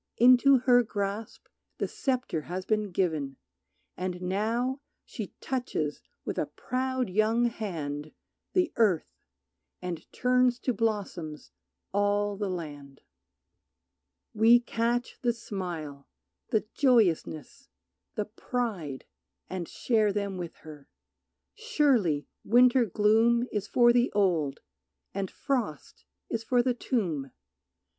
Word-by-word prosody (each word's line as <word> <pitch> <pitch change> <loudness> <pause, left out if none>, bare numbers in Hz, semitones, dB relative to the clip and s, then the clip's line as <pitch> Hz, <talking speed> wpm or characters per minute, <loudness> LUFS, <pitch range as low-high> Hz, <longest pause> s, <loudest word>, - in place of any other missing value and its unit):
Into 255 +3 +7
her 245 0 +5
grasp 205 -1 -4 0.3
the - - -1
sceptre 250 - -1
has 185 +1 -3
been 215 0 0
given 160 -7 -1 0.6
And 180 -1 -3
now 225 +9 -1 0.2
she - - -7
touches 245 - -2 0.2
with - - -2
a - - 0
proud 260 -1 -2
young 215 +5 +2
hand 155 -10 -4 0.4
The 360 -3 +2
earth, 200 -8 +2 0.7
and 175 -3 -6
turns 250 0 +3
to 250 - 0
blossoms 195 - -3 0.4
all 205 0 +1
the 205 0 -2
land. 145 -6 -7 1.3
We 225 +3 +6
catch 235 0 -1
the 240 -1 +2
smile, 175 -11 -6 0.4
the 220 - +1
joyousness, 235 - +1 0.5
the 210 - -1
pride, 210 - -4 0.5
And 180 -3 -3
share 220 -4 +1
them 200 -1 -2
with 175 -2 -6
her. 150 -3 -11 0.6
Surely 275 - +2 0.2
winter 245 +2 +5
gloom 225 +4 +3
Is 210 -1 -2
for 240 +2 +5
the 245 +1 +3
old, 170 -9 +1 0.5
and 195 -1 -2
frost 240 - -3 0.2
is 225 -1 -3
for 245 +1 +2
the 255 0 +2
tomb. 175 - -2
210 Hz, 110 wpm, -28 LUFS, 175-245 Hz, 1.3 s, Into